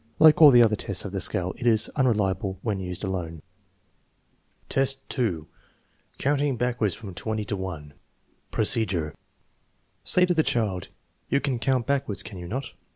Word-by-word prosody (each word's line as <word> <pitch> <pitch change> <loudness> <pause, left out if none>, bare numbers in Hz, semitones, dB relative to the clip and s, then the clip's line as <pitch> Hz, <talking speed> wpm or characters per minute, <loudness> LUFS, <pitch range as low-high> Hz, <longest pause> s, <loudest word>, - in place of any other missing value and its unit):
Like 155 0 +6
all 150 - +11
the 120 -3 +7
other 110 -2 +3
tests 100 -1 -4
of 100 - -5
the 95 -1 -3
scale, 90 +1 0
it 120 - -3
is 110 -2 +3
unreliable 105 -6 0
when 105 -4 -2
used 90 0 -6
alone. 85 -5 -4 1.2
V3H, 135 0 +2
2. 95 - -1 0.7
Counting 140 -1 0
backwards 120 -6 0
from 100 -5 -9
20 110 +3 -4
to 100 - -3
1 85 -7 -7 0.6
Procedure. 95 - 0 0.9
Say 180 - +6
to 180 - +1
the 160 - +3
child: 105 - -1 0.4
"You 140 - +2
can 135 -4 -2
count 125 0 0
backwards, 140 -8 0
can 95 - -9
you 90 - -8
not 130 +8 -5
110 Hz, 160 wpm, -25 LUFS, 95-130 Hz, 1.2 s, all